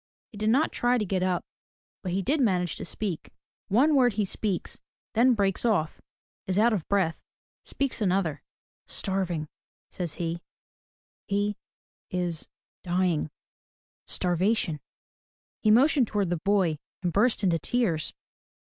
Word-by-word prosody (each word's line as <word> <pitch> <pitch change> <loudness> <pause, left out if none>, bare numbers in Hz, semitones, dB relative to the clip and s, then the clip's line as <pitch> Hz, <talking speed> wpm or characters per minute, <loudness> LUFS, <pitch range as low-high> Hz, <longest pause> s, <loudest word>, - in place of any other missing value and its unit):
He 215 - -11
did 215 +1 +1
not 275 +8 +3
try 245 +1 +2
to 215 - 0
get 190 -1 -1
up, 185 -1 0 0.6
but 185 - -3
he 190 +2 0
did 290 - +1
manage 180 -7 +1
to - - -5
speak. 185 -2 -4 0.4
One 270 +10 +4
word 250 -5 +4
he 210 0 0
speaks 195 0 -2 0.2
— - - -76
then 240 +2 +5
breaks 195 -3 +1
off, 195 -10 +1 0.2
— - - -70
is 185 0 0
out 230 +2 +5
of 185 -7 -2
breath, 190 -5 +1 0.2
— - - -61
speaks 275 -4 -1
another: 180 -7 +1 0.3
— - - -62
"Starving, 185 -5 -1 0.2
— - - -78
" - - -62
says 175 -4 -2
he, 170 0 -3 0.9
"he 205 +1 0 0.3
— - - -81
is 170 -2 -3 0.2
— - - -78
dying 175 -3 +1 0.4
— - - -72
starvation." 180 -2 +1 0.8
He 215 - +3
motioned 260 +3 +5
toward 200 -4 0
the 175 - +1
boy 190 -7 +2 0.2
and 175 -2 0
burst 220 +1 +3
into 170 -4 +3
tears. 175 -5 0
195 Hz, 165 wpm, -27 LUFS, 175-220 Hz, 0.9 s, then